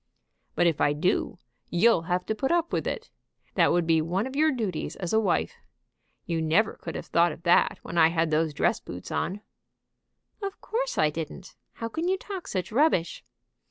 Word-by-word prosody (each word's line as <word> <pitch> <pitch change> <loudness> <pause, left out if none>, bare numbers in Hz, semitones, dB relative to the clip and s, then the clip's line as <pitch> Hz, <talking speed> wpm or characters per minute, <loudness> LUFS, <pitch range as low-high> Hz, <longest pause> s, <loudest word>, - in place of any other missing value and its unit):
"But 175 - +3
if 165 -3 +2
I 145 - +4
do, 180 +6 0 0.3
you'll 185 +1 +4
have 180 0 0
to - - -1
put 265 +7 -1
up 340 -1 +1
with - - 0
it. 470 -1 -4 0.4
That - - +4
would 175 -1 +2
be 160 -1 +3
one 180 +7 -1
of 265 +1 -6
your 310 +2 +4
duties 215 - -3
as 180 0 -4
a 220 - +5
wife. 200 -5 0 0.7
You 165 -1 -1
never 165 +8 +2
could 165 - -7
have - - -5
thought 170 0 +3
of 160 - -10
that 175 -1 +4
when 170 - -2
I 160 - +7
had 165 -1 0
those 155 +1 +2
dress 145 - +1
boots 90 +1 -9
on." 200 +3 -2 1.0
"Of 395 0 -5
course - - -2
I 150 - +3
didn't. 165 +4 -7 0.2
How 230 - -5
can 320 +9 -3
you 380 +1 +2
talk 385 -2 -7
such 185 -1 -3
rubbish?" 235 - +2
180 Hz, 195 wpm, -27 LUFS, 165-260 Hz, 1.0 s, I